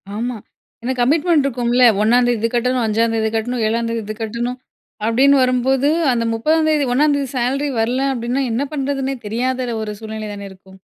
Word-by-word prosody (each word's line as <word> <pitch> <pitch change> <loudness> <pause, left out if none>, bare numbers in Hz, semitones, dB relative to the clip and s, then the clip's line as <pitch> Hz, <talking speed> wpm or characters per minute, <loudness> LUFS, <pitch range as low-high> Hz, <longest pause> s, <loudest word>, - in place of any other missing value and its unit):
ஆமா, 235 +2 -3 0.5
எனக்கு 255 0 -1
கமிட்மெண்ட் 300 +3 +3
இருக்கும்ல 245 -1 +1 0.2
1ம் 240 +3 +4
தேதி 240 -2 +1
இது 230 - +1
கட்டணும், 250 +1 +1
5ம் 225 +1 +1
தேதி 220 -1 0
கட்டணும், 240 +2 -2
7ம் 230 +1 -1
தேதி 230 0 -2
இது 215 +1 -5
கட்டணும், 235 +3 -3 0.5
அப்டின்வரும்போது 260 +2 +3 0.2
அந்த 235 -1 0
30ம் 310 +8 +1
தேதி 300 -3 +2
1ம் 295 +3 +3
தேதி 280 -1 -2
சேலரி 270 +4 0
வரல 240 +4 0
அப்டினா 245 +2 -2
என்ன 245 +5 -1
பண்ணுறதுன்னே 275 -1 -2
தெரியாத 250 +3 -2
ஒரு 210 -1 -5
சூழ்நிலை 220 -1 -6
தான 200 -1 -7
இருக்கும்! 190 0 -17
245 Hz, 170 wpm, -19 LUFS, 225-270 Hz, 0.5 s, 1ம்